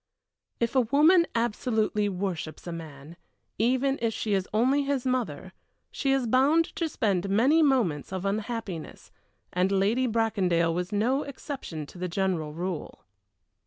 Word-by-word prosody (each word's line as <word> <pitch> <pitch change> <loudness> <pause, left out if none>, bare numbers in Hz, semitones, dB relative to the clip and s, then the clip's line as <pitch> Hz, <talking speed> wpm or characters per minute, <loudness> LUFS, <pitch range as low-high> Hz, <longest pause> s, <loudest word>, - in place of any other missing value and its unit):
If 235 +2 -1
a 260 - +6
woman 305 +9 +5
absolutely 220 -2 0
worships 180 -4 -4
a 175 - -5
man, 160 -1 -9 0.4
even 260 +4 +2
if 230 -2 0
she 215 - -1
is 190 -1 0
only 255 +7 +3
his 275 -2 -1
mother, 220 - -2 0.4
she 275 - -1
is 270 -2 +2
bound 275 +8 +4
to 330 -2 -1
spend 200 - 0
many 255 +11 +4
moments 235 - +1
of 190 0 -4
unhappiness, 210 -4 -4 0.4
and 185 +2 +1
Lady 210 +7 +2
Bracondale 190 -7 +1
was 180 +3 -3
no 235 +7 +1
exception 265 - -6
to 175 - -13
the 180 - -2
general 175 -4 -1
rule. 175 0 -5
215 Hz, 145 wpm, -27 LUFS, 180-260 Hz, 0.4 s, a